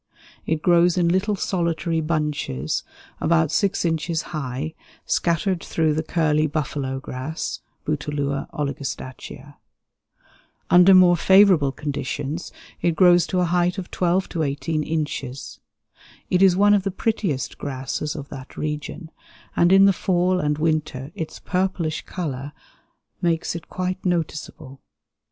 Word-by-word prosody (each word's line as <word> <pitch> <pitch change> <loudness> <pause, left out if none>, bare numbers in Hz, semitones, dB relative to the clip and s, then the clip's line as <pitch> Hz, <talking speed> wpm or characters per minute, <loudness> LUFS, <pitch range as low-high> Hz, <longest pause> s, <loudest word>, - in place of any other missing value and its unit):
It 160 0 -1
grows 175 0 +4
in 170 -1 +3
little 190 +4 +1
solitary 170 -3 -1
bunches, 150 - -2 0.4
about 160 -1 +2
6 195 -1 +1
inches 165 0 0
high, 145 +1 -3 0.3
scattered 170 +1 0
through 160 -2 +1
the 155 - 0
curly 155 -2 +1
buffalo 140 -3 -3
grass 135 +4 -5 0.3
(Bouteloua 145 -2 -2
oligostachya). 140 -2 -6 1.1
Under 180 +2 +8
more 180 -1 +7
favorable 185 -5 +5
conditions 145 +3 -4 0.3
it 170 -2 +1
grows 175 -2 +5
to 180 +3 0
a - - +3
height 175 +2 +1
of 185 -2 -6
12 180 +1 +1
to 165 - -3
18 155 +2 -1
inches. 145 -4 -4 0.7
It 180 - +3
is 190 -2 +6
one 205 +2 +5
of 205 - +4
the 195 - -2
prettiest 185 - -2
grasses 140 +3 -3
of 145 -3 -7
that 130 -2 -10
region, 155 +2 -5 0.4
and 175 +1 +4
in 195 +1 +7
the 200 - +5
fall 180 0 +1
and 150 -2 0
winter 150 -3 -1
its 160 - -6
purplish 180 -4 -1
color 145 -5 -5 0.7
makes 170 -1 0
it 170 - -8
quite 185 0 -3
noticeable. 155 -6 -3
160 Hz, 130 wpm, -23 LUFS, 145-180 Hz, 1.1 s, Under